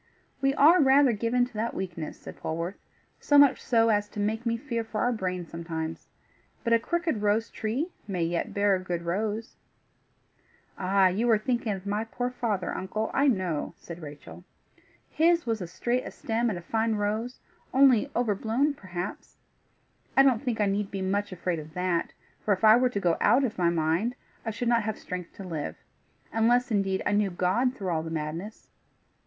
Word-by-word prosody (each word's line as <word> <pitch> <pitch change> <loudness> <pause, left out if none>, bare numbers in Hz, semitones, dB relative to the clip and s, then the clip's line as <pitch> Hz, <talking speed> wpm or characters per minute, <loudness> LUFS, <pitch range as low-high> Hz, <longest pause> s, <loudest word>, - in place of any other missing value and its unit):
"We 275 0 +2
are 320 +6 +6
rather 270 -1 +5
given 235 +3 +1
to 245 - -14
that 225 +2 -2
weakness," 175 -4 -5
said - - -10
Polwarth, 165 +4 -4 0.4
"so 290 - +3
much 285 -2 +6
so 230 -2 +3
as 205 -1 +1
to 210 - -8
make 220 +3 -1
me 230 0 +1
fear 235 -2 -3
for 220 -1 -4
our 245 - +2
brains 180 -5 -3
sometimes. 165 -1 -5 0.6
But 230 -3 +2
a 230 - +5
crooked 330 -3 -1
rose 210 +2 +1
tree 255 +11 -2 0.2
may 185 -4 -1
yet 170 +1 -1
bear 200 0 +2
a - - -2
good 175 -2 -4
rose." 210 +6 -3 1.2
"Ah! 190 0 +3
you 220 +6 0
are 225 - +6
thinking 235 0 -1
of 190 0 -7
my 205 +2 -1
poor 245 +2 -3
father, 215 -7 -2
uncle, 215 +4 -3
I 280 +1 +3
know," 185 - 0
said 170 0 -10
Rachel. 150 +3 -10 0.6
"His 335 +2 +2
was 225 -3 -1
a 180 - -4
straight 240 +8 -2
stem 230 +1 -1
and 200 - -2
a 175 - -8
fine 225 +3 0
rose, 215 +4 -2 0.3
only 260 -4 +5
overblown, 235 +5 +1
perhaps. 185 -6 -7 0.8
I 270 - +9
don't 255 -5 +3
think 245 -5 -2
I 210 - +3
need 200 0 -1
be 195 -1 -4
much 200 +2 -1
afraid 180 -2 -2
of 155 +1 -11
that, 180 -2 0 0.3
for 205 - +3
if 190 - -16
I 215 0 +9
were 250 +1 +3
to 205 - -2
go 175 -4 +1
out 260 +3 +4
of 225 -6 -2
my 170 -1 +4
mind, 170 +8 0 0.3
I - - +2
should 230 +2 -3
not 235 -1 +3
have 220 0 -3
strength 180 -1 -7
to 195 - -9
live 165 -5 -4 0.6
unless 240 +2 +3
indeed 195 -2 +1
I - - +1
knew 205 -1 +2
God 190 +9 +1
through 195 -7 -4
all 160 -2 0
the 160 - -6
madness. 165 +6 -5
210 Hz, 190 wpm, -27 LUFS, 180-240 Hz, 1.2 s, I